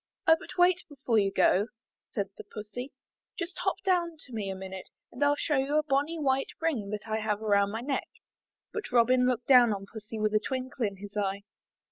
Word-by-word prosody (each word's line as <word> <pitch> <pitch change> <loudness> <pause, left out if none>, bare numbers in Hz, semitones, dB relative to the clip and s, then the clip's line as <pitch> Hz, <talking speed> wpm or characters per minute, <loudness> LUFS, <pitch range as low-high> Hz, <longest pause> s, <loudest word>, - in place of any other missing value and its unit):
''Oh, 320 - +8
but - - -11
wait 360 0 +4
before 260 -6 +1
you 195 -1 +2
go," 195 +2 +3 0.4
said 200 -3 -2
the - - -9
Pussy. 230 +6 -7 0.5
"Just 360 0 -4
hop 385 - +1
down 345 -3 +1
to 255 - -14
me 210 -3 -3
a 190 - -3
minute 190 0 -7 0.2
and 245 - -10
FU 285 0 +4
show 295 -1 +1
you 275 +3 +1
a 305 - +3
bonny 290 +3 0
white 270 -3 +1
ring 270 -12 -1
that 210 +1 -5
I 220 0 0
have 210 -1 -1
around 200 -2 +3
my 225 +2 -3
neck." 270 +2 -2 0.7
But 435 - -4
Robin 250 +1 +4
looked 250 -1 0
down 245 -4 +7
on 195 -1 -3
Pussy 220 +2 -8
with 215 0 0
a 215 - +5
twinkle 260 0 -2
in 200 - -6
his 205 +1 -10
eye. 200 -1 -1
240 Hz, 210 wpm, -29 LUFS, 210-285 Hz, 0.7 s, Oh